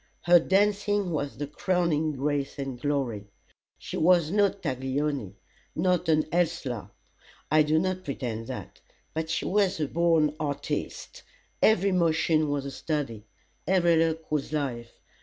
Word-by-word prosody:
Her 175 0 +6
dancing 205 +1 +1
was 145 -3 -3
the 145 - -3
crowning 160 0 0
grace 140 +1 -2
and 135 -3 -5
glory. 130 -8 -1 0.5
She - - -6
was 170 -1 +4
no 205 0 +4
Taglioni 135 - -3 0.4
not 180 -3 +1
an 155 -1 +4
Ellsler 150 - -1 0.6
I 155 0 +6
do 155 +1 +2
not 185 +2 -1
pretend 120 -6 -4
that. - - -8 0.3
But 160 0 -3
she 165 - -1
was 195 -3 +1
a 150 - 0
born 160 -2 +2
artiste. 150 - -4 0.4
Every 200 -2 +4
motion 160 -3 +2
was 145 -1 -1
a 140 - -4
study. 135 -9 -3 0.4
Every 175 -2 +4
look 160 -1 0
was 150 -2 -1
life. 125 -6 -3
155 Hz, 140 wpm, -27 LUFS, 140-175 Hz, 0.6 s, Her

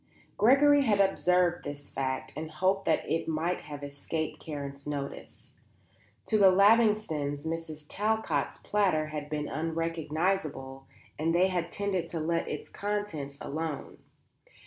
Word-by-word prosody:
Gregory 285 +5 +6
had 205 -4 +3
observed 180 -2 +3
this 145 0 -7
fact 130 -1 -3
and 155 +2 -4
had 155 - -15
hoped 190 +3 +2
that - - +1
it 165 - -1
might 165 +3 0
have 145 -1 -8
escaped 150 +2 -4
Karen's 140 -2 -6
notice. 140 -1 -6 0.7
To 215 - +2
the 195 -2 +8
Lavingtons 200 -8 +3
Mrs. 160 -2 -5
Talcott's 220 +4 0
platter 190 -7 +1
had 150 -1 -4
been 150 -1 -2
unrecognizable 160 -3 -2 0.3
and 165 +2 +1
they 185 +2 +4
had 175 -2 -2
tended 195 -4 -2
to 165 - -3
let 165 +2 0
its - - -5
contents 200 -9 -3
alone. 155 0 -4
165 Hz, 135 wpm, -29 LUFS, 150-195 Hz, 0.7 s, the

